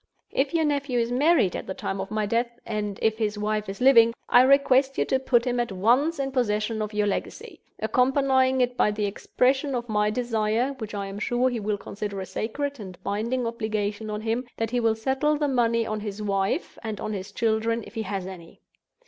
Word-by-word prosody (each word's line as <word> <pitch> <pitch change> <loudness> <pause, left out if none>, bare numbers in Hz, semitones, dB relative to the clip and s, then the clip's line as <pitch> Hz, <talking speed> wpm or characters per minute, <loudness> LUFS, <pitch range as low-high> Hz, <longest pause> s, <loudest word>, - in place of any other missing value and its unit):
If 270 +1 0
your 330 -2 +2
nephew 280 -4 0
is 235 0 0
married 270 - +3
at - - -5
the 190 - -4
time 195 0 -3
of 195 - -6
my 215 0 -1
death, 235 +3 -1
and 210 -3 -3
if 220 0 +2
his 210 -1 -1
wife 210 0 -1
is 195 - -6
living, 230 -3 +6
I 245 - +7
request 270 0 +4
you - - +2
to 265 - +1
put 245 -2 +2
him 245 -1 0
at 240 -3 -1
once 245 - +2
in 270 -1 -2
possession 220 -3 0
of 210 0 -3
your 210 -1 0
legacy; 200 - -4 0.2
accompanying 260 0 +2
it 245 0 +1
by 210 - +3
the 210 0 -1
expression 260 +6 0
of 240 0 -3
my 210 -1 +1
desire 230 +2 0
(which 220 -2 -6
I 200 -1 -3
am 195 +1 -6
sure 245 +3 +1
he 240 - -2
will 210 0 -1
consider 200 0 -5
a 190 - -4
sacred 280 +8 -3
and 185 -4 -8
binding 235 +5 -1
obligation 215 -2 -2
on 210 0 -3
him) 230 +3 -1
that 225 -1 -2
he 245 - +1
will 225 -2 +2
settle 270 +6 0
the 295 0 0
money 230 -3 +2
on 215 -1 -3
his 205 -1 -6
wife—and 205 +1 -2
on 215 - -3
his 195 0 -6
children, 225 +1 0
if - - -13
he 225 - -3
has 195 -3 -4
any. 180 -3 -10
225 Hz, 215 wpm, -25 LUFS, 210-255 Hz, 0.2 s, I